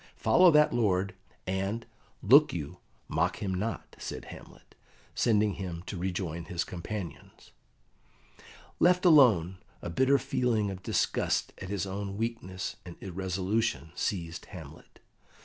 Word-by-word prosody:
Follow 185 -1 +5
that 150 -2 +5
lord, 95 -4 +1 0.3
and, 95 +5 -2 0.4
look 140 +9 +7
you, 75 -5 -5 0.3
mock - - 0
him 95 -2 -2
not," 105 +5 -4
said - - -6
Hamlet, - - -13 0.4
sending 105 -3 +2
him 90 -3 -6
to 100 - -5
rejoin 90 -2 -3
his 85 -1 -2
companions. 90 -2 -7 1.3
Left 180 +1 +4
alone, 110 - +5 0.2
a 85 - -6
bitter 130 +9 +4
feeling 125 -6 0
of 95 -1 -7
disgust - - 0
at 95 - -7
his 100 -1 -2
own 100 +1 -4
weakness 110 -5 -4
and 90 -2 -9
irresolution 95 - -2
seized 85 -3 -3
Hamlet. - - -12
95 Hz, 125 wpm, -29 LUFS, 90-115 Hz, 1.3 s, look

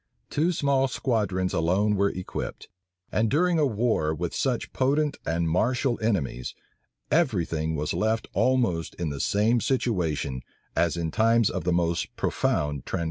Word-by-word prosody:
Two 160 +5 +2
small 140 -4 +2
squadrons 100 -8 -1
alone 95 +6 +2
were 100 0 +2
equipped, 90 -1 -6 0.4
and 110 +1 +1
during 170 +5 +2
a 150 - +4
war 110 -9 0
with 85 +2 -3
such 125 -4 -1
potent 145 +3 +1
and 85 0 0
martial 120 - +1
enemies, 80 - -1 0.6
every 130 - +2
thing 80 0 -2
was 75 0 -2
left 110 +1 0
almost 115 -11 +1
in 85 -2 -2
the 70 - -5
same 110 - +2
situation 80 - -1 0.3
as 85 0 +1
in 80 -2 -2
times 115 +1 +3
of 90 -4 -4
the 90 - +2
most 85 0 0
profound 75 -3 0
tranquillity. - - -3
100 Hz, 150 wpm, -26 LUFS, 85-125 Hz, 0.6 s, a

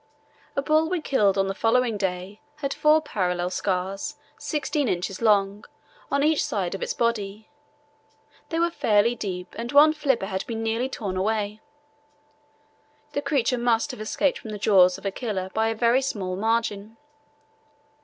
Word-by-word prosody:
A 275 - 0
bull 310 +2 +2
we 365 -1 0
killed 210 -10 +2
on 195 - +3
the 195 - -2
following 230 +2 +2
day 190 0 -3
had 280 -2 -3
four 305 +1 +4
parallel 180 - -1
scars, 195 +10 -2 0.2
sixteen 295 -2 -2
inches 185 +1 -2
long, 205 -1 +2 0.5
on 280 0 +1
each 310 0 +3
side 190 -5 -2
of 195 - -5
its - - -2
body; 215 -2 -2 1.0
they 330 - -2
were 340 +1 +2
fairly 215 -4 +2
deep 185 -6 -5
and 235 +1 -4
one 300 +2 +7
flipper 270 -9 0
had 190 -1 -3
been 225 -1 -3
nearly 230 +3 -1
torn 200 -7 -4
away. 210 +1 -1 1.5
The 285 - -2
creature 255 -4 +1
must 240 +3 +1
have 250 - -9
escaped 260 +6 0
from 220 - -9
the 210 - -5
jaws 185 -3 +5
of 195 - -14
a 195 - 0
killer 190 -5 -4
by 220 0 +1
a 225 - -1
very 235 +3 +3
small 195 -9 -3
margin. 220 0 -1
220 Hz, 165 wpm, -25 LUFS, 195-260 Hz, 1.5 s, one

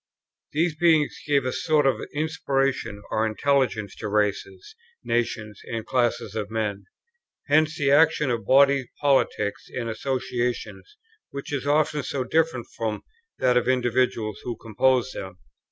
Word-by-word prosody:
These 160 +1 +1
beings 160 -3 +3
gave 140 -3 +2
a 130 - 0
sort 155 -3 +2
of 135 - +2
inspiration 135 -8 -1
or 110 - +1
intelligence 110 -3 0
to 110 - -5
races, 105 - -1 0.3
nations, 115 -3 -2
and 115 -1 -4
classes 120 -5 0
of 105 -2 -3
men. 105 -3 -3 0.6
Hence 155 +1 +3
the 140 -1 +2
action 150 -2 +4
of 115 -1 -3
bodies 140 -1 +5
politic 135 -7 +2 0.2
and 120 -2 -2
associations, 125 - -3 0.3
which 140 +1 -7
is 140 0 -2
often 150 0 +2
so 135 -2 -3
different 160 -3 0
from 110 -2 -3 0.3
that 125 -1 +3
of 125 - +2
the 130 - +3
individuals 120 -3 0
who 120 - -4
compose 130 +3 +1
them. 95 -5 -8
130 Hz, 140 wpm, -25 LUFS, 115-145 Hz, 0.6 s, bodies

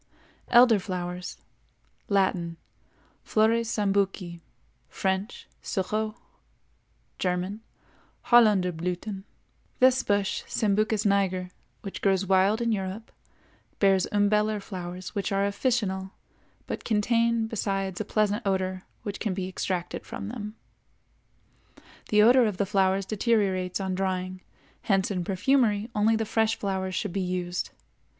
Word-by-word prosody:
ELDER 240 -3 +6
FLOWERS. 180 -1 -5 0.7
Latin—Flores 200 +4 -1
Sambuci; 195 -4 0 0.5
French—Sureau; 205 +2 -3 1.0
German—Hollunderblüthen. 190 0 0 0.5
This 260 0 +5
bush, 205 -1 0
Sambucus 215 0 +1
niger, 190 -2 +1 0.3
which 195 - -7
grows 195 -1 +2
wild 195 +4 +3
in 230 -1 +1
Europe, 195 +2 -4 0.7
bears 195 -2 +3
umbellar 210 +1 +2
flowers 180 -2 -7
which 200 -1 -2
are 195 0 +2
officinal, 200 -3 -1 0.5
but - - -5
contain 230 +1 +2
besides 195 -3 -2
a - - -3
pleasant 210 +1 +1
odor 190 -1 -1 0.2
which 205 -1 -5
can 205 -5 -2
be 185 -1 -3
extracted 180 -1 -3
from 205 - -6
them. 215 -2 -6 1.5
The 210 0 +5
odor 245 +1 +6
of 205 -4 -3
the 200 - +1
flowers 195 -1 +1
deteriorates 195 -4 0
on 190 -1 -2
drying, 185 0 -2 0.4
hence 195 -1 +1
in 180 -3 -1
perfumery 210 +3 +1
only 215 +1 +3
the 220 0 -1
fresh 220 +1 +1
flowers 190 -2 -2
should 205 -5 -2
be 195 - -1
used. 180 -1 -2
200 Hz, 110 wpm, -27 LUFS, 185-215 Hz, 1.5 s, ELDER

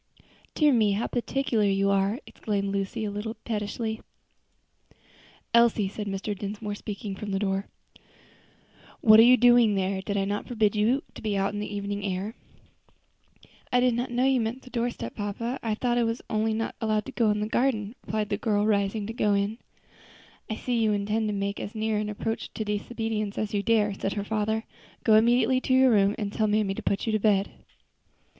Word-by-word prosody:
"Dear 300 -3 +4
me, 215 -4 +3
how 210 +4 -1
particular 245 -2 0
you 195 0 +2
are!" 200 +4 +1
exclaimed 200 -2 -3
Lucy 200 +3 -2
a 205 - -3
little 215 +2 -4
pettishly. 220 0 -3 1.5
"Elsie," 235 -3 +4
said 205 +2 -6
Mr. 200 +1 -3
Dinsmore, 205 +1 -5
speaking 205 -1 -6
from 205 +2 -6
the 195 - 0
door, 195 0 -1 1.3
"what 215 -1 +8
are 230 +2 +8
you 255 - +7
doing 240 -3 +5
there? 190 0 -1
Did 200 +1 -3
I 195 - +1
not 205 +1 -3
forbid 220 -3 +1
you 230 +6 +2
to - - -10
be 210 -3 -1
out 195 +1 0
in 205 - -3
the 210 - -4
evening 200 0 -3
air?" 195 +2 -3 1.4
"I 250 - +4
did 250 -1 +3
not 245 +2 -2
know 245 +1 +1
you 265 -2 +3
meant 230 +4 -3
the 255 - -14
doorstep, 235 - -3
papa. 230 +5 -3
I 220 -2 -1
thought 240 +1 0
I - - +3
was 230 +1 -2
only 220 0 +1
not 225 +1 -2
to 225 - -2 0.2
go 235 -2 +1
down 210 - +3
into - - -2
the - - -6
garden," 225 -4 0
replied 215 -1 -2
the 205 - 0
little 220 0 -1
girl, 205 +1 +2
rising 205 0 +1
to 225 - -5
go 210 -3 +2
in. 200 +3 -1 0.9
"I 220 - -2
see 245 +1 -1
you 215 -1 +2
intend 210 +2 0
to - - -1
make 200 +1 -2
as 205 - -6
near 215 -1 0
an 210 0 -2
approach 225 +2 -4
to 220 - -3
disobedience 215 0 -3
as 215 -1 -2
you 205 - +1
dare," 210 -1 +2
said 195 0 -3
her 205 - -3
father. 220 +1 -1 0.4
"Go 220 - +4
immediately 240 +3 +4
to 260 - +1
your 260 -1 +6
room, 200 -1 +3
and 205 -2 -3
tell 215 - +1
mammy 210 -2 +1
to - - -6
put 195 - -1
you 225 - 0
to 215 - +1
bed." 200 -2 +2
215 Hz, 205 wpm, -27 LUFS, 200-230 Hz, 1.5 s, what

